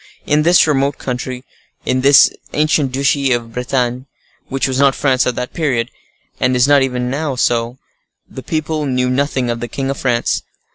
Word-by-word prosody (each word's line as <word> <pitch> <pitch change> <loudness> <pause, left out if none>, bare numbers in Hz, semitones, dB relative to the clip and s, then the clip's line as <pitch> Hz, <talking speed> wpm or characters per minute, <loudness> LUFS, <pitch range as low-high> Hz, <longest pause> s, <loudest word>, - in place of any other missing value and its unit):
In 150 +1 +2
this 175 +3 +5
remote 140 -2 0
country, 125 0 -5 0.4
in 130 0 0
this 140 +1 +6 0.2
ancient 150 -3 +1
duchy 140 0 +1
of 115 -1 -4
Bretagne, 125 +1 -2 0.4
which 135 0 -1
was 130 0 -2
not 140 -1 +4
France 130 -2 +1
at 125 - -1
that 125 0 -5
period, 130 -8 -1 0.5
and 125 0 +1
is 125 +2 +3
not 145 0 +5
so - - +3
even 125 -1 -3
now, 145 -1 -2 0.9
the 130 - -9
people 155 0 -2
knew 125 -1 0
nothing 130 -2 0
of 120 - -4
the 120 - -4
king 135 +3 -3
of 140 - -5
France. 120 -2 0
130 Hz, 180 wpm, -17 LUFS, 125-140 Hz, 0.9 s, this